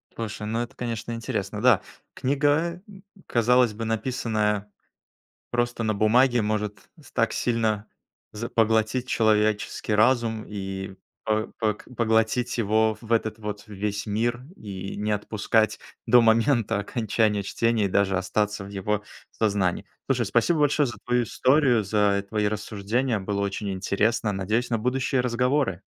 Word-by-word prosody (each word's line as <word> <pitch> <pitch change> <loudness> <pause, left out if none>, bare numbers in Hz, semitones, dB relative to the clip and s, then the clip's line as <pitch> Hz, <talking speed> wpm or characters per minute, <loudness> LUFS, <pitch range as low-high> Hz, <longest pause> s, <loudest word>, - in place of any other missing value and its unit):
Слушай, 110 -2 -5
ну, 115 +2 -1
это, 120 - -6
конечно, 120 -1 -4
интересно. 105 -3 -3
Да, 120 -5 +5 0.3
книга, 150 +6 +1 0.4
казалось 120 0 +3
бы, 115 +2 -5
написанная 110 -3 -1 0.8
просто 120 -1 -1
на 110 -1 0
бумаге, 120 +4 +4
может 105 -1 -3
с 145 - -17
так 115 -2 +1
сильно 110 -3 0 0.5
за 115 +2 -5
поглотить 110 +2 +1
человеческий 110 -1 +1
разум 115 0 +2
и 95 -1 -5 0.3
по 110 0 0
пог 105 -2 -1
поглотить 115 +2 +1
его 110 0 +2
в 115 - -13
этот 110 -1 +1
вот 105 -1 -6
весь 105 0 -3
мир, 120 +4 -1
и 95 -2 -7
не 105 +1 -2
отпускать 110 +1 +1 0.3
до 125 - +7
момента 115 -1 +3
окончания 105 0 0
чтения, 115 +1 +1
и - - -1
даже 95 0 +2
остаться 105 +2 -1
в - - -9
его 100 +1 -2 0.3
сознании. 100 -5 0 0.2
Слушай, 125 -4 +1
спасибо 120 - +2
большое 145 0 +3
за 120 - -5
твою 125 0 +2
историю, 125 +2 +3
за 100 0 +1
твои 105 -1 0
рассуждения! 110 +3 -1
Было 100 +1 -2
очень 100 +1 -2
интересно. 105 +4 0
Надеюсь 105 +5 -1
на 115 - +2
будущие 130 +3 0
разговоры! 125 - 0
110 Hz, 140 wpm, -25 LUFS, 105-120 Hz, 0.8 s, до